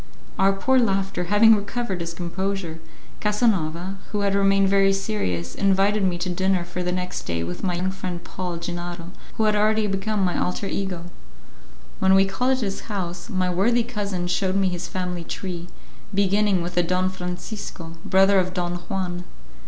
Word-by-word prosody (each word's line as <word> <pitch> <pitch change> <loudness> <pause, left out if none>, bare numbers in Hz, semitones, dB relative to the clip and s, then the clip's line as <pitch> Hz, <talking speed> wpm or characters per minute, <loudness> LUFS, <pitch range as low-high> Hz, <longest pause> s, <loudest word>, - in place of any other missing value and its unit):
Our 195 0 +5
poor 260 +7 +3
laugher 195 -5 0
having 220 +4 +6
recovered 205 -2 -3
his 170 0 -4
composure, 175 -1 -3 0.4
Casanova, 195 -4 0
who 210 - -1
had 200 -1 +1
remained 195 0 +4
very 195 0 +4
serious, 90 - -2
invited 195 +1 +2
me 180 -2 +1
to 175 +2 -2
dinner 185 0 +1
for 175 +1 -5
the 180 0 -1
next 180 0 -3
day 85 -1 -1
with 85 +1 -5
my 180 -2 0
young 185 +2 -1
friend 185 -2 -5
Paul 180 -2 -4
Gennaro, 175 0 -5 0.2
who 220 - +1
had 215 -1 +3
already 215 +1 +3
become 195 0 0
my 180 - 0
alter 180 +3 -1
ego. 190 -3 -3 1.0
When 190 0 +5
we 195 0 +6
called 250 +7 +1
at 260 - -1
his 195 -3 -2
house, 180 -2 -4
my 185 -4 0
worthy 230 +7 +3
cousin 205 -6 -3
showed 185 +2 0
me 195 -1 +3
his 175 -1 -4
family 180 0 -3
tree, 175 0 -5 0.4
beginning 200 -1 +2
with 175 +1 -5
a - - +6
Don 185 +2 +1
Francisco, 180 -1 -6
brother 195 +1 +5
of 185 0 -1
Don 175 -1 -1
Juan. 180 -2 -2
190 Hz, 175 wpm, -24 LUFS, 175-200 Hz, 1.0 s, having